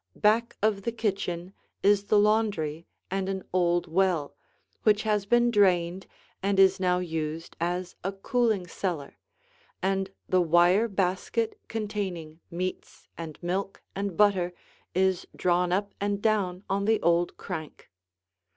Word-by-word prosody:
Back 225 +3 +2
of 210 -2 +2
the 235 - -2
kitchen 195 -5 -2 0.3
is 205 0 +4
the 210 - +3
laundry 205 -7 +1 0.2
and 195 0 -1
an 190 -1 -3
old 175 -1 +2
well, 175 -3 +1 0.5
which 215 -1 +3
has 210 -2 0
been 240 +1 +4
drained 185 -3 +2 0.3
and 195 0 +1
is 190 -1 +6
now 180 -1 +2
used 165 -2 -4
as 175 +1 -2
a 195 - -1
cooling 215 0 0
cellar, 170 -5 -4 0.6
and 195 0 0 0.2
the 185 -1 +3
wire 175 +6 +4
basket 195 +3 -1
containing 195 -8 -4
meats 180 +1 -5
and 160 -2 -7
milk 190 +3 -3
and 200 -3 -3
butter 190 -4 +3 0.4
is 190 -1 +1
drawn 180 0 +1
up 200 +2 0
and 200 0 0
down 200 -4 0
on 200 +1 0
the 220 0 +3
old 170 +1 +2
crank. 160 - -7
190 Hz, 135 wpm, -27 LUFS, 175-205 Hz, 0.6 s, is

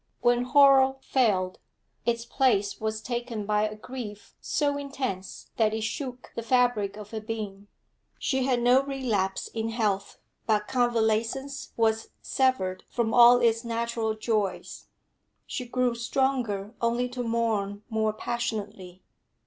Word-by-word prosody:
When 240 0 +3
horror 270 -1 +6
failed, 195 -10 +1 0.5
its 235 0 0
place 215 -7 +1
was 220 0 -2
taken 240 -3 -3
by 210 +1 +1
a 215 - -8
grief 215 -2 -8
so 290 -2 0
intense 265 -9 -5
that 220 -2 +2
it 220 - -3
shook 250 +2 -5
the - - -2
fabric 230 -4 +1
of 210 -1 -10
her 220 -1 -4
being. 210 -2 -6 0.5
She 265 -2 0
had 250 -3 +1
no 250 +2 +6
relapse 240 -9 -1
in 225 0 -3
health, 210 -4 -1 0.3
but 210 -1 +2
convalescence 240 +3 0
was 225 -1 +1
severed 190 -9 0
from 225 -2 -1
all 245 0 +8
its 230 0 +3
natural 230 -1 -1
joys; 215 -4 -2 0.6
she 250 -3 -5
grew 250 0 +1
stronger 235 -4 -1
only 235 +1 +1
to 245 0 -4
mourn 220 -3 -1
more 220 -1 0
passionately. 210 -5 -4
230 Hz, 135 wpm, -27 LUFS, 215-250 Hz, 0.6 s, all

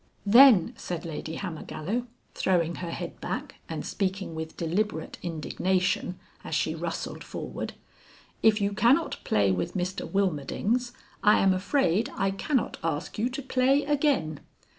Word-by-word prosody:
"Then," 230 -1 +7
said 175 -1 -5
Lady 160 0 -5
Hammergallow, 185 +6 -4 0.3
throwing 170 -3 +1
her 175 - -4
head - - -6
back - - -4
and - - -4
speaking 190 -3 -2
with 160 0 -6
deliberate 170 0 -2
indignation, 180 +2 -1 0.3
as - - -3
she - - +1
rustled - - -4
forward, - - -5 0.7
"if 220 -1 +5
you 200 0 0
cannot 240 +10 +2
play 100 -2 +2
with 90 -1 -2
Mr 185 0 -2
Wilmerdings 200 - 0 0.3
I 210 -1 +6
am 195 -1 +4
afraid 200 - +1
I 195 -5 +1
cannot 255 +6 -1
ask 160 +4 -2
you 235 +3 +1
to 265 +2 -5
play 265 +2 +3
again." 280 - +1
190 Hz, 140 wpm, -27 LUFS, 165-235 Hz, 0.7 s, Then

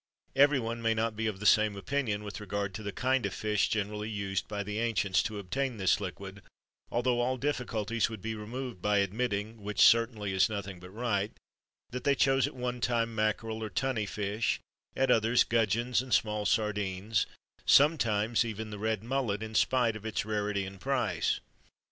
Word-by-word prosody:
Everyone 130 -5 +3
may 115 -1 +2
not 110 0 0
be 110 +1 -1
of 100 -3 -3
the 105 - -6
same 110 0 +5
opinion 105 0 -2
with 105 +1 -6
regard 100 -2 -3
to 110 - -6
the 100 -1 -4
kind 130 +4 +1
of 100 -1 -2
fish 105 -2 +1
generally 105 0 -2
used 100 -3 -2
by 105 -1 -3
the 105 +1 -4
ancients 105 -5 +2
to 105 - -4
obtain 120 +6 -2
this 95 -2 +2
liquid, - - -7 0.5
although 120 0 +1
all 130 +2 0
difficulties 115 -5 -1
would 110 -2 -7
be 110 +3 -4
removed 115 0 -6
by 105 +1 +2
admitting 105 +1 -1
which 105 +1 -5
certainly 115 -4 +4
is 95 +2 +4
nothing 100 -3 -5
but 90 +1 -11
right 105 -1 -1 0.6
that 125 - -5
they 140 - +3
chose 135 0 +3
at 145 - -9
one 125 -1 -3
time 115 -1 +1
mackerel 110 +1 -1
or 110 - -3
tunny 110 +1 -1
fish; 105 +2 -1 0.4
at 135 -1 +2
others, 115 +1 +4
gudgeons 115 +2 +1
and 130 -1 +1
small 105 -1 0
sardines; 105 -1 0 0.4
sometimes 120 -7 +4
even 110 -1 -5
the 105 - -6
red 110 -1 -1
mullet, 115 -4 -1
in 110 0 -7
spite 120 0 +2
of 110 - -8
its 110 -2 -2
rarity 105 -2 -1
and 95 0 -10
price. 130 -5 0
110 Hz, 180 wpm, -30 LUFS, 105-120 Hz, 0.6 s, same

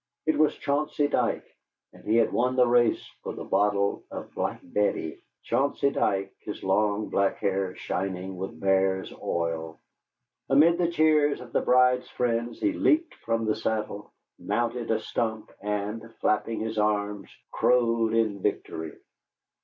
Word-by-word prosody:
It 155 - +2
was 155 -1 +3
Chauncey 145 +1 0
Dike, - - 0 0.5
and - - -16
he 110 - +1
had 115 - +3
won 125 +2 +1
the 125 -1 +5
race 120 -1 +3 0.2
for - - -5
the - - -6
bottle 100 -1 +1
of - - -8
"Black - - -2
Betty," 90 -4 -1 0.2
Chauncey 140 0 +1
Dike, 95 -6 0
his 105 - -7
long, 105 +2 +1
black 100 -1 +1
hair 95 -2 -1
shining 95 0 -3
with 95 +1 -6
bear's 95 0 +1
oil. 80 -1 -2 0.7
Amid 165 +6 +5
the 175 - +3
cheers 155 -3 +3
of 120 -2 -11
the - - +2
bride's 125 0 +3
friends 120 -1 -1
he 315 -2 +1
leaped 320 +1 +2
from 115 0 -2
his 110 - -1
saddle, 105 -2 -3 0.3
mounted 120 +2 -2
a 110 - +2
stump 110 -1 -3
and, 105 +2 -3
flapping 110 +1 0
his 110 0 -2
arms, 105 -1 0 0.2
crowed 115 -2 +2
in 110 -4 +1
victory. 80 -3 -3
110 Hz, 145 wpm, -27 LUFS, 100-125 Hz, 0.7 s, the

